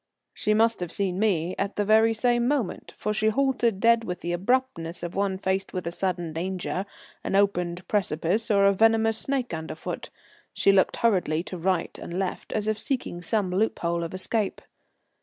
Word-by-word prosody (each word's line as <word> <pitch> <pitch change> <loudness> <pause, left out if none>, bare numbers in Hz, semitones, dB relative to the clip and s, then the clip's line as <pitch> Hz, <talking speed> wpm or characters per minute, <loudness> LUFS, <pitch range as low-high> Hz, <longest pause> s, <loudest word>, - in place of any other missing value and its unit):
She 215 - 0
must 225 +1 +3
have 175 -2 -4
seen 190 -2 -1
me 185 -5 +1
at 200 +1 -2
the 205 - 0
very 220 +2 +4
same 240 +1 +2
moment, 265 -9 -2
for 210 - -1
she 215 +1 +1
halted 240 -3 +1
dead 230 +1 +4
with 180 -4 -5
the 175 - -3
abruptness 180 -4 -1
of 175 +1 -4
one 195 -1 0
faced 190 0 -2
with 185 -3 -3
a 170 - -2
sudden 175 -3 -2
danger, 185 +3 -3 0.4
an - - -1
opened 180 -3 +1
precipice, 195 +2 0
or 200 -2 +4
a 200 - +5
venomous 225 +1 +3
snake 265 -6 -2
under 160 -1 -5
foot. - - -6 0.4
She 200 - +4
looked 190 -1 +3
hurriedly 180 -8 +1
to 185 - -7
right 185 0 0
and 170 - -6
left, 190 -1 -3
as 215 -1 -1
if 215 0 0
seeking 255 - -3
some 190 +1 0
loophole 170 -4 0
of 165 +2 -5
escape. 205 +2 -1
195 Hz, 185 wpm, -26 LUFS, 180-225 Hz, 0.4 s, a